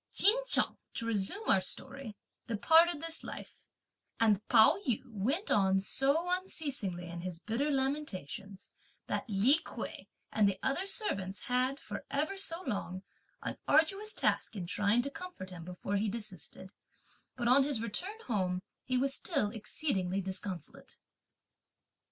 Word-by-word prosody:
Ch'in 415 - +7
Chung, - - +3 0.2
to 230 - -2
resume 230 - -1
our 190 - +5
story, 260 +3 -4 0.3
departed 320 +8 +4
this 330 0 -5
life, - - -8 0.6
and 215 -3 +4
Pao 230 - +6
yü 250 -2 0
went 250 - -1
on 195 -1 +4
so 275 - +2
unceasingly 285 - -3
in 170 0 -6
his 180 -1 -4
bitter 230 - -1
lamentations, 200 - -3 0.3
that 260 - -3
Li 225 +10 +4
Kuei - - -7 0.2
and 210 -2 +4
the 195 - -2
other 350 +9 0
servants 200 - -1
had, 255 +2 +1
for - - -6
ever 300 +7 0
so 370 -2 -2
long, 190 -5 -3 0.4
an - - -4
arduous 390 +8 +3
task - - +1
in 185 -4 -4
trying 205 +6 +2
to 280 - -3
comfort 360 - -7
him 175 -2 -8
before 180 +3 -3
he 210 +2 +1
desisted; 195 -3 -8 0.6
but 240 -2 -1
on 265 +3 +7
his 275 -4 0
return 355 - -2
home 185 -5 0 0.2
he 255 0 0
was 270 +2 +1
still 275 - 0
exceedingly 200 - -2
disconsolate. 190 -3 -6
230 Hz, 145 wpm, -32 LUFS, 195-290 Hz, 0.6 s, Ch'in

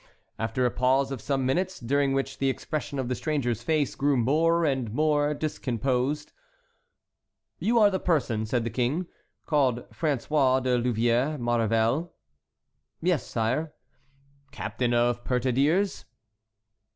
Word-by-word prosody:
After 115 +3 0
a 120 - +2
pause 135 +3 +2
of 130 -5 -5
some 135 0 -1
minutes, 185 +8 0
during 140 +3 +1
which 135 0 -2
the 135 - +2
expression 145 +1 -4
of 130 -2 -2
the 125 - -1
stranger's 125 -5 -1
face 150 +1 0
grew 140 -1 +1
more 165 +7 +2
and 130 -6 -1
more 150 +2 +1
discomposed, 135 -1 -2 1.3
"You 235 +3 +1
are 210 -2 +6
the 190 - -1
person," 125 -12 0
said 120 +1 0
the 115 - -3
King, 130 - 0 0.4
"called 130 -5 +1
François 140 -3 +1
de 125 -1 +2
Louvièrs 120 +5 +1
Maurevel?" 120 +6 +1 0.9
"Yes, 175 -4 +1
sire." 130 +8 -1 0.8
"Captain 125 -2 -2
of 120 0 +1
petardeers?" 135 +11 +1
135 Hz, 125 wpm, -27 LUFS, 120-150 Hz, 1.3 s, are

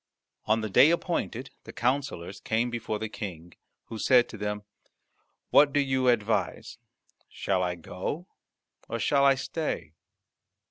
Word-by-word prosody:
On 110 +1 +3
the 110 - -3
day 130 +9 +7
appointed 150 -7 -1
the - - -10
counsellors 120 -8 -2
came 115 +2 0
before 115 -2 -3
the 110 +1 -3
King, 90 -6 -7 0.3
who 110 - -8
said 125 0 +5
to 110 - -8
them, 105 0 -3 0.9
"What 145 0 +6
do 145 - +3
you 130 -2 +1
advise? 110 -6 0 0.5
Shall 95 -2 -1
I 90 -1 -1
go, 90 - -5 0.6
or 115 - -2
shall 140 +4 +2
I 140 -1 +6
stay?" 140 - -4
115 Hz, 140 wpm, -28 LUFS, 105-135 Hz, 0.9 s, day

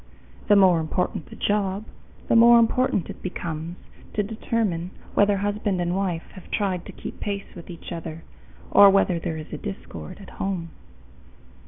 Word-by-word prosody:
The 205 - +6
more 185 -4 +6
important 170 +2 -2
the - - -10
job, 205 0 0 0.4
the - - +3
more 235 +1 +8
important 230 -4 +2
it - - -12
becomes 170 -2 -5 0.4
to 210 - +2
determine 205 -5 -1 0.2
whether 205 0 +4
husband 205 -1 -1
and 175 0 0
wife 185 -4 -1
have 185 - -13
tried 190 -4 -1
to - - -7
keep - - -8
pace 200 -1 -4
with 170 0 -11
each 170 - -9
other, 165 -1 -6 0.5
or 200 0 +9
whether 195 -3 +3
there 165 -1 -3
is 155 - -8
discord 195 -2 -7
at 195 - -12
home. 185 -4 -2
190 Hz, 160 wpm, -24 LUFS, 170-205 Hz, 0.5 s, or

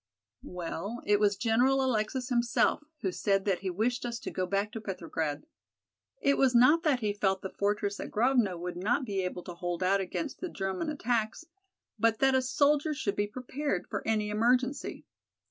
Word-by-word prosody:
"Well, 180 +6 -5
it 205 0 +3
was 205 -1 +3
General 250 +4 +3
Alexis 250 +2 -1
himself 240 +4 +2 0.2
who 190 - 0
said 195 +1 0
that 195 -3 +1
he 195 - -3
wished 225 +7 -1
us 235 -1 -3
to - - -5
go 185 -1 -2
back 200 +2 0
to 225 - -6
Petrograd. 165 - -3 0.7
It 280 - +2
was 260 -2 +4
not 255 +8 +6
that 295 -7 +1
he 210 -2 0
felt 195 -2 0
the 190 - -4
fortress 205 0 -1
at - - -5
Grovno 230 -5 +2
would 175 +1 -5
not 240 +9 0
be 200 -4 -1
able 180 -1 -4
to 175 - -7
hold 175 +1 -3
out 195 +2 +3
against 265 - -4
the 360 - -3
German 195 - -3
attacks, 240 -1 -1 0.5
but 225 +1 +3
that 270 +2 +3
a 260 - +4
soldier 290 +4 +2
should 205 -8 -2
be 205 0 0
prepared 255 -2 -3
for - - -3
any 215 -1 +1
emergency. 250 +5 0
215 Hz, 185 wpm, -30 LUFS, 195-255 Hz, 0.7 s, not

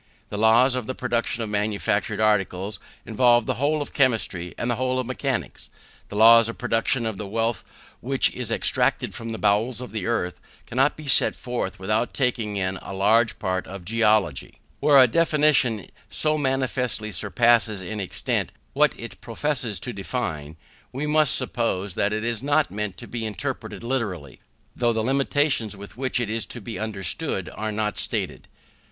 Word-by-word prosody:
The 105 - -5
laws 115 +4 +5
of 125 -3 -3
the 130 - -3
production 120 -2 -1
of 110 - -5
manufactured 105 0 -1
articles 105 -2 0 0.3
involve 120 0 +3
the - - 0
whole 150 +1 +1
of - - -13
chemistry 110 -9 0
and 120 - -2
the 120 -2 0
whole 130 0 0
of 130 - -1
mechanics. 130 +1 -4 0.4
The - - -8
laws 115 +1 +7
of 115 - -5
the - - -27
production 115 +2 0
of 110 -3 -3
the 105 - -5
wealth 115 +3 -1 0.4
which 135 +2 0
is 125 -3 -3
extracted - - +1
from 115 0 -6
the 110 - -4
bowels 110 +4 +1
of 125 - -7
the 110 -3 -4
earth, 90 -7 -2 0.2
cannot 135 +4 +1
be 155 - -9
set 135 - +4
forth 120 -6 -4
without 105 +5 -1
taking 115 -6 -1
in 95 0 -1
a 95 - -8
large 110 +4 +3
part 95 -2 -2
of 95 -1 -9
geology. 105 - +1 0.2
When 145 -1 +5
a 130 - +9
definition 150 - +2 0.2
so 155 0 +2
manifestly 130 -5 -1
surpasses 110 +2 +2
in 105 +4 -5
extent 95 - -1 0.2
what - - +2
it - - -9
professes 125 -8 -1
to 125 - -4
define, 80 - -4 0.3
we 140 +4 -3
must 150 -2 +4
suppose 100 -5 -1
that 100 +3 0
it 110 +1 -2
is 115 -1 -2
not 145 +2 +1
meant 105 -2 -4
to 120 - -10
be 120 -2 -5
interpreted 110 +1 -4
literally, 105 - -3 0.4
though 120 -1 +1
the 110 -1 -1
limitations 135 -4 +1
with 100 +1 -10
which 130 0 -1
it 120 - -1
is 115 +1 -2
to 120 - -6
be 110 +1 -7
understood 100 -6 -2
are 110 0 -3
not 105 0 -1
stated. - - 0
115 Hz, 175 wpm, -24 LUFS, 105-125 Hz, 0.4 s, a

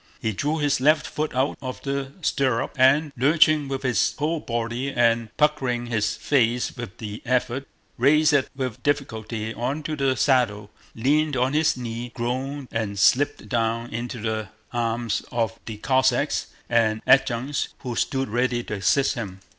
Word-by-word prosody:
He 110 - -1
drew 145 +10 -1
his 145 -4 +1
left 155 +3 +4
foot 155 -3 -3
out 130 +3 0
of 130 -1 -5
the 140 -1 -3
stirrup 130 -6 0
and, 140 +4 +4
lurching 150 +2 +4
with 135 -1 -4
his 125 -2 +1
whole 155 +3 0
body 120 +1 -3
and 115 -2 +2
puckering 135 -5 +1
his 110 -2 0
face 120 -3 +1
with 115 -4 -7
the 105 -1 -7
effort, 125 +1 -1 0.3
raised 150 +4 +4
it 140 -2 +2
with 130 -4 -4
difficulty 110 -6 -2
onto 145 +6 -3
the 135 -2 +1
saddle, 110 -7 +1 0.2
leaned 145 +4 +1
on 130 +2 +1
his 155 -2 +2
knee, 120 0 -5
groaned, 130 +3 -3
and 110 -3 -2
slipped 145 +9 +3
down 115 -1 -1
into 120 +1 -4
the 110 -1 -3 0.2
arms 115 -2 -1
of 115 -1 -1
the 110 -2 -5
Cossacks 130 +3 +1 0.2
and 110 -2 +2
adjutants 135 +1 +2
who 125 -3 -4
stood 135 +2 0
ready 120 +2 0
to - - -6
assist 105 +8 +2
him. 100 -7 -6
125 Hz, 155 wpm, -24 LUFS, 115-140 Hz, 0.3 s, left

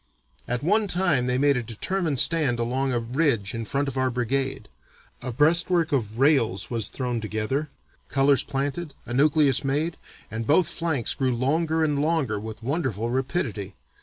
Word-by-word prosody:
At 125 +2 -2
one 210 +5 +2
time 175 -9 +2
they 125 0 +1
made 140 0 +3
a - - 0
determined 140 - -2
stand 150 -7 +2
along 130 +3 -1
a 120 - +1
ridge 115 -3 0
in 115 -1 -4
front 140 +6 -1
of 135 -1 -3
our 130 0 +2
brigade. 130 +2 -2 0.5
A 125 - -4
breastwork 165 +5 +2
of 115 -6 -1
rails 120 -8 +2
was 115 -3 -1
thrown 125 -3 -3
together, 110 +8 -2 0.4
colors 135 -1 +3
planted, 140 +3 -3
a 120 - -6
nucleus 145 0 +3
made, 150 +5 -1 0.3
and 110 0 -4
both 160 +3 +4
flanks 160 -9 -1
grew 130 -2 0
longer 160 +6 +1
and 145 -2 +1
longer 150 -9 0
with 110 +1 -8
wonderful 120 - -1
rapidity. 120 - -2
135 Hz, 165 wpm, -25 LUFS, 120-155 Hz, 0.5 s, both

